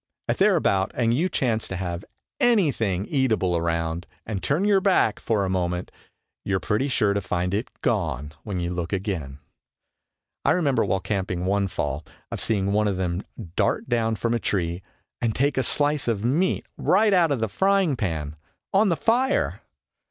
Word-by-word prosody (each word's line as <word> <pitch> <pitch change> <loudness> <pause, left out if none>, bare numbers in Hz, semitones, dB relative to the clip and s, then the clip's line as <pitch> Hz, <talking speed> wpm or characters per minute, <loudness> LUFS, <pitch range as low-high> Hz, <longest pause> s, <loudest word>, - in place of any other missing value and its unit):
If - - 0
they - - +5
are - - +4
about 95 0 +1
and 115 -2 +2
you 165 +9 +1
chance 115 -8 0
to 95 - -5
have 90 -1 -4 0.4
anything 135 - +2
eatable 110 - +1
around 85 0 -1 0.2
and 105 -4 -3
turn 160 +8 +1
your 200 -2 +4
back 185 - +3
for 105 -3 0
a - - -1
moment 90 -1 -1 0.5
you 100 - 0
are - - +1
pretty 110 +8 0
sure 105 -6 +2
to 100 - 0
find 90 0 -1
it 105 +5 -1
gone 75 - -1
when 95 0 -4
you 85 0 -2
look 85 -1 -3
again. 90 -9 -3 1.1
I - - +4
remember 150 -6 +2
while 95 - 0
camping 95 -3 -2
one 100 +1 +1
fall, 75 -4 -3 0.3
of - - -3
seeing 100 -3 +1
one 105 0 +2
of 100 -2 -1
them 90 -1 -1 0.3
dart - - +1
down 115 -2 +1
from 115 +2 -1
a 120 - +1
tree 85 -4 -1 0.4
and 115 -2 0
take 140 +2 +1
a 130 - +2
slice 145 +1 +1
of 110 -2 0
meat 165 +10 +1
right 210 +2 +3
out 175 -3 +4
of 140 - +1
the 110 - 0
frying 190 - +2
pan 80 - -3 0.4
on 200 +2 +4
the 170 - +1
fire! 250 - +1
105 Hz, 185 wpm, -24 LUFS, 90-140 Hz, 1.1 s, they